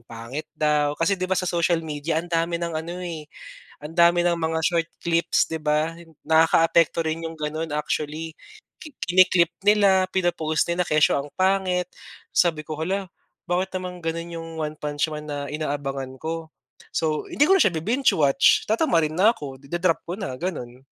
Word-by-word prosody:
pangit 115 +6 -7
daw. 150 -1 +1
Kasi 165 +4 +1
'di 185 - -1
ba 190 - +1
sa 185 - 0
social 170 -1 +1
media 155 +1 -3
ang 175 - -13
dami 165 +1 +1
ng 170 -1 -3
ano, 165 +3 -4
eh, 160 -4 -6 0.5
ang 160 +3 -9
dami 170 0 +5
ng 175 -1 +1
mga 160 0 -1
short 165 0 +1 0.2
clips, 170 0 +1
'di 160 - -2
ba? 155 +2 0 0.2
Nakakaapekto 165 +1 +3
rin 165 +1 -3
'yong 165 - -5
gano'n 155 0 -4
actually. 155 +1 -3 0.4
Kini-clip 185 - +2 0.2
nila, 200 -3 +5
pina-post 170 -3 0
nila, 175 +1 0
kesyo 155 -2 +3
ang 140 +1 -6
pangit. 185 -1 +1 0.4
Sabi 165 -3 +2
ko, 155 0 -7
"Hala, 185 +4 -2 0.4
bakit 185 +2 0
naman 180 -2 -6
gano'n 165 +1 -3
'yong 165 0 -7
One 155 0 -4
Punch 145 +1 -2
Man 150 0 -6
na 140 0 -4
inaabangan 140 -3 -3
ko?" 160 0 -5 0.4
So, 155 -2 -1
hindi - - -6
ko 385 - +6
na - - +3
siya 185 - +2
bi-binge-watch. 160 - +3
Tatamarin 165 - +2
na 215 +5 +5
ako. 135 -8 -8
Ida-drop 175 +3 0
ko 175 - -4
na, 130 -10 -4
gano'n. 130 -8 -5
165 Hz, 170 wpm, -24 LUFS, 155-175 Hz, 0.5 s, ko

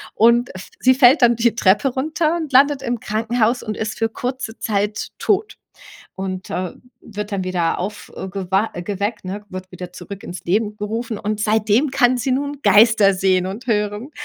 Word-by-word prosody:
Und 235 +1 +3
f 185 - -9
sie 260 0 +5
fällt 260 +2 +6
dann 240 0 +5
die 230 -1 +2
Treppe 210 +5 +3
runter 310 +5 -1
und 310 -5 -5
landet 280 +1 +5
im 240 -2 -2
Krankenhaus 230 +2 0
und 215 -2 -4
ist 220 0 -3
für 225 - +1
kurze 245 -1 -5
Zeit 210 0 -1
tot. 420 +1 0 0.6
Und, 185 -1 -5
äh, 180 -1 -3 0.3
wird 210 -1 -7
dann 190 -2 -2
wieder 180 -3 -1
aufgewa 190 +1 -3
geweckt, 205 +4 -3
ne 200 +3 -5
wird 185 0 -8
wieder 180 0 -8
zurück 200 +2 -9
ins 180 - -8
Leben 210 +3 0
gerufen 220 +1 -4
und 210 0 -3
seitdem 220 +5 +2
kann 255 -2 +3
sie 245 +3 -2
nun 285 +2 -2
Geister 205 -1 +5
sehen 185 -1 +2
und 210 +7 -7
hören. 210 +5 -1
215 Hz, 175 wpm, -20 LUFS, 195-245 Hz, 0.6 s, fällt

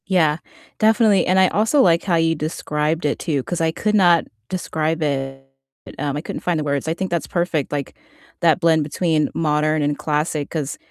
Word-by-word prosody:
Yeah, 160 -6 +2 0.4
definitely. 220 -2 +4
And 185 +1 +3
I 190 - +6
also 225 +8 +2
like 170 -4 +3
how 180 -4 +1
you 165 0 +2
described 155 0 -2
it 145 - 0
too, 145 -6 -1
'cause 175 +3 -4
I 160 0 +2
could 210 +5 -1
not 175 -4 +4 0.2
describe 160 -3 -2
it, 135 -2 -3 0.5
um, 145 -1 -2
I - - -3
couldn't - - -6
find 175 -3 0
the - - -2
words. 140 0 -2
I 160 - +1
think 185 +2 -4
that's 170 -4 -1
perfect, 170 -5 -1
like 145 -2 -4 0.5
that 165 -1 +3
blend 165 -3 +3
between 155 0 0
modern 155 -1 +1
and 145 0 0
classic, 150 -1 -2
'cause 150 -3 -4
160 Hz, 195 wpm, -20 LUFS, 150-175 Hz, 0.5 s, I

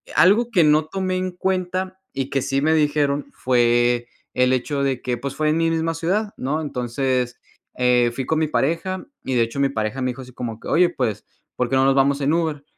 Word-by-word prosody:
algo 225 +6 +5
que 185 -7 +4
no 150 0 +4
tomé 185 +2 -2
en 185 0 -1
cuenta 185 +1 -2
y 135 0 -4
que 135 - +1
sí 135 +2 0
me 160 +2 +3
dijeron 145 -2 +1
fue, 120 -1 +2 0.3
el 125 0 +3
hecho 140 +3 -1
de 135 -3 -1
que 125 -1 -1
pues 135 +2 -5
fue 155 0 +1
en 155 - +1
mi 165 0 +2
misma 165 0 0
ciudad, 195 +6 -1
¿no? 150 +5 -2
Entonces, 125 -2 -2 0.4
eh, 125 -1 +3
fui 130 - -3
con 160 +3 0
mi 155 - +1
pareja 170 +6 -1 0.2
y 130 - -2
de 120 - +4
hecho, 115 +5 -4
mi 140 - +3
pareja 110 0 -3
me 130 - 0
dijo 130 +1 -6
así 125 -1 -14
como 115 -3 -5
que: - - -10
"Oye, 175 +1 +4
pues 125 - -2 0.3
¿por 125 -1 -1
qué 135 - +1
no 130 0 +4
nos 135 - +4
vamos 140 +1 +2
en 145 +3 +2
Uber?". 160 -4 -1
140 Hz, 225 wpm, -22 LUFS, 125-165 Hz, 0.4 s, algo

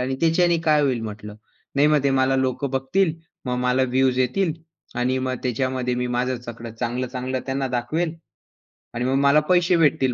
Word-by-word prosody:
"आणि 130 +1 -1
त्याच्याने 170 +1 +3
काय 150 -1 +5
होईल?" 130 -4 +1
म्हटलं. 105 -1 -7 0.4
"नाही 140 +1 +4
मग 150 -2 +3
ते 140 - +3
मला 135 0 +2
लोक 130 +1 -1
बघतील 140 +6 0 0.3
मग 125 -1 -1
मला 125 +1 +2
व्ह्यूज 130 0 +2
येतील 165 +7 +1 0.5
आणि 130 +1 +1
मग 130 0 -2
त्याच्यामध्ये 125 0 -1
मी 125 0 -1
माझं 125 0 -1
सगळं 115 -1 -7
चांगलं-चांगलं 125 +1 -2
त्यांना 135 0 -1
दाखवेल 155 +7 -1 0.8
आणि 120 +1 -2
मग 130 +1 +1
मला 140 +2 +6
पैसे 180 0 +4
भेटतील" 135 -5 +2
130 Hz, 170 wpm, -23 LUFS, 125-140 Hz, 0.8 s, मला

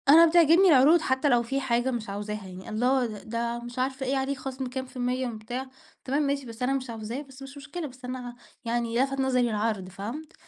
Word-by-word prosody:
أنا 325 +4 +9
بتعجبني 335 +3 +6
العروض 305 +3 +6
حتى 265 0 +1
لو 240 -2 +4
في 270 +4 -2
حاجة 245 0 +1
مش 230 -4 -4
عاوزاها 205 0 -5
يعني، 185 0 -9
الله 250 +4 +2
د 215 -1 -8
ده 235 +1 -2
مش 240 +1 -7
عارفة 265 +1 -1
إيه 270 +1 +1
عليه 270 +1 -1
خصم 265 0 -5
كام 260 +1 -4
في 260 - -18
المِيّة 250 +1 0
بتاع، 240 +3 -5 0.4
تمام 280 +3 +1
ماشي، 280 -1 -1
بس 230 +1 -7
أنا 260 +2 +2
مش 265 -2 -3
عاوزاه 225 +3 -5
بس 270 -2 -14
مش 270 +1 -9
مشكلة، 300 +3 -6
بس 255 -1 -12
أنا 250 -1 -6 0.3
يعني 235 +1 +1
لفت 275 0 -2
نظري 255 -2 +2
العرض، 210 -3 -1
فهمت، 235 - -7
255 Hz, 220 wpm, -27 LUFS, 235-275 Hz, 0.4 s, أنا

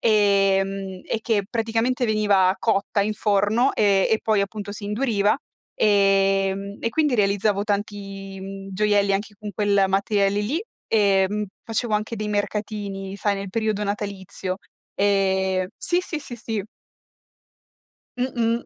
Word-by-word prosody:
E, 200 -3 +4
mhmm, 195 -1 -6
e 225 - 0
che 220 -3 +1
praticamente 230 +2 0
veniva 200 -3 +3
cotta 205 -2 +1
in 210 +1 0
forno 210 +6 +2
e 200 -2 +3
e 220 - +2
poi 215 -2 +2
appunto 205 +1 -4
si 205 0 -7
induriva 210 -1 +1 0.4
ehm, 195 -1 +2
e 230 - 0
quindi 300 -2 +2
realizzavo 200 0 +2
tanti 200 -1 -4
mhmm, 195 0 -7
gioielli 205 0 +2
anche 205 +2 -2
con 210 0 -7
quel 200 -2 +2
materiale 200 +1 +1
lì 290 - -1 0.2
ehm, 205 -1 +2 0.2
facevo 225 0 -1
anche 215 +2 -1
dei 215 -1 -3
mercatini 205 -1 -3
sai 200 0 0
nel 195 -1 -5
periodo 215 -1 -1
natalizio. 200 -2 -4 0.4
Ehm 190 -2 +2
sì, 350 - 0
sì, 320 -4 -5
sì, 245 -3 -8
sì. 220 -3 -3 1.6
Mh-mh. 235 -2 0
205 Hz, 135 wpm, -23 LUFS, 195-215 Hz, 1.6 s, E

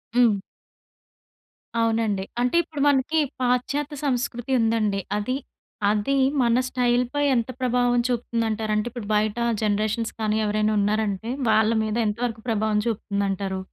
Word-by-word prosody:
హ్మ్. 235 -4 +5 1.4
అవునండి. 225 -3 +1 0.2
అంటే 250 +5 +1
ఇప్పుడు 310 -3 -6
మనకి 285 +3 +2 0.2
పాశ్చాత్య 275 +4 0
సంస్కృతి 250 -1 -2
ఉందండి. 220 -3 +1 0.2
అది, 255 +6 -1 0.5
అది 215 +6 0 0.2
మన 235 0 +3
స్టైల్ 245 -1 +2
పై 290 - +1
ఎంత 235 0 0
ప్రభావం 245 -1 +2
చూపుతుందంట‌రు? 225 -2 -1
అంటే, 210 +2 0
ఇప్పుడు 230 -3 -7
బయట 215 +1 +1 0.3
జనరేషన్స్ 215 +2 0
కానీ 215 0 +1
ఎవరైనా 215 +1 +1
ఉన్నారంటే, 210 +1 0 0.2
వాళ్ళ 220 0 +4
మీద 215 0 -2
ఎంత 210 +1 -2
వరకు 225 -2 -4
ప్రభావం 215 -1 +1
చూపుతుందంటారు? 200 -3 -2
225 Hz, 125 wpm, -24 LUFS, 210-245 Hz, 1.4 s, హ్మ్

